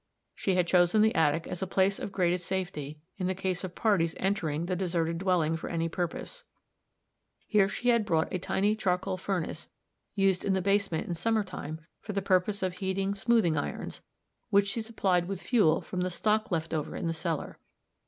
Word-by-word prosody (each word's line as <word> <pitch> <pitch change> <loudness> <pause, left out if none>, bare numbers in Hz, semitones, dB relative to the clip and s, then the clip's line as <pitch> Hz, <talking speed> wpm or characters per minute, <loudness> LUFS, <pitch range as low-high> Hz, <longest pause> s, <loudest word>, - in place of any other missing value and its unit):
She 190 - 0
had 180 -1 +3
chosen 180 +4 +4
the 220 - +4
attic 160 +1 +2
as 180 - -5
a 190 - -1
place 190 +1 +2
of - - -5
greatest 180 -2 0
safety, 175 -6 -3 0.2
in 180 - 0
the 185 - 0
case 185 -1 -2
of 180 -1 -6
parties 185 -7 +2
entering 170 -5 -1
the 185 +1 -1
deserted 170 -2 -1
dwelling 175 -4 +2
for 165 - -5
any 165 -1 0
purpose; 180 - -4 1.0
here 200 -3 +3
she 245 +3 -1
had 235 -2 +4
brought 165 -6 0
a 185 - 0
tiny 205 +4 +1
charcoal 185 -2 0
furnace, 180 -4 -3 0.5
used 195 -2 +2
in 195 - +1
the 190 - +2
basement 195 -3 +1
in 175 - -2
summer 220 +6 +1
time 160 -4 -7 0.2
for 210 - -6
the 195 - 0
purpose 190 +1 +2
of 185 -1 0
heating 195 +1 -1
smoothing 200 -4 +2
irons, 145 - -4 0.5
which 200 -1 +4
she 230 - -1
supplied 190 -6 0
with 195 -1 -3
fuel 200 -11 +3
from 185 - -4
the 180 - 0
stock 215 +4 +1
left 165 -2 -2
over 155 -2 -2
in - - -3
the 165 - 0
cellar. 160 -1 -3
185 Hz, 195 wpm, -29 LUFS, 170-200 Hz, 1.0 s, chosen